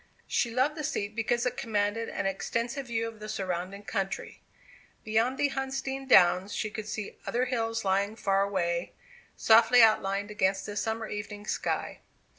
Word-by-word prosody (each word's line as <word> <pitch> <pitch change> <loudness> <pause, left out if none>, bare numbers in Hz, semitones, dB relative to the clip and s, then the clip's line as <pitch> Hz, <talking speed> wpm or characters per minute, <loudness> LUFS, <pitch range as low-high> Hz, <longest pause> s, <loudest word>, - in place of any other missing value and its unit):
She 235 - 0
loved 260 +6 +1
the 305 -1 -6
seat 205 -6 -2
because 235 +1 0
it 250 - -1
commanded 215 0 -1
an 200 - -3
extensive 235 +7 -2
view 230 -1 -1
of 225 -1 -9
the 215 0 -7
surrounding 190 0 -3
country. 195 +1 -4 0.6
Beyond 225 +4 +1
the 285 0 +1
Huntsdean 270 0 -3
downs 185 -2 +5
she 215 - -2
could 215 0 -6
see 210 -1 -5
other 245 +2 +1
hills 225 -3 -2
lying 200 +2 +1
far 195 -3 +1
away, 175 -3 -1 0.4
softly 230 +2 +6
outlined 205 -2 +2
against 190 -2 0
the 205 - -6
summer 220 +1 -2
evening 210 0 -6
sky. - - -2
215 Hz, 160 wpm, -29 LUFS, 200-235 Hz, 0.6 s, softly